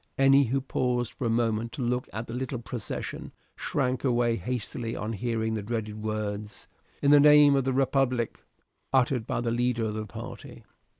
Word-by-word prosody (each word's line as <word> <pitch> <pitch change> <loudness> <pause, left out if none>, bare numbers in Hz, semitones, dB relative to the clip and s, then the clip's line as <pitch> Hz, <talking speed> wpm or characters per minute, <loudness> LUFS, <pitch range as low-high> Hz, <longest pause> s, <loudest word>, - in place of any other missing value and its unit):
Any 135 +1 +6
who 135 +3 0
paused 125 -3 -1
for 120 - -5
a - - +1
moment 115 0 0
to 135 - -4
look 125 +1 -1
at 110 +1 -5
the 115 - -8
little 130 +1 -3
procession, 115 -1 -5 0.2
shrank 130 -2 -1
away 120 -3 +2
hastily 115 +2 -4
on 110 +2 -3
hearing 110 0 -1
the 110 - -2
dreaded 110 0 -4
words, 105 -1 -4 0.4
"In 140 - +5
the 145 - +8
name 150 -1 +7
of 135 -2 +1
the 135 - +1
republic," 130 -3 0 0.5
uttered 125 -3 +2
by - - -1
the 120 -1 -1
leader 120 -1 0
of 105 - -2
the 110 0 -4
party. 120 +2 -9
120 Hz, 180 wpm, -27 LUFS, 110-130 Hz, 0.5 s, the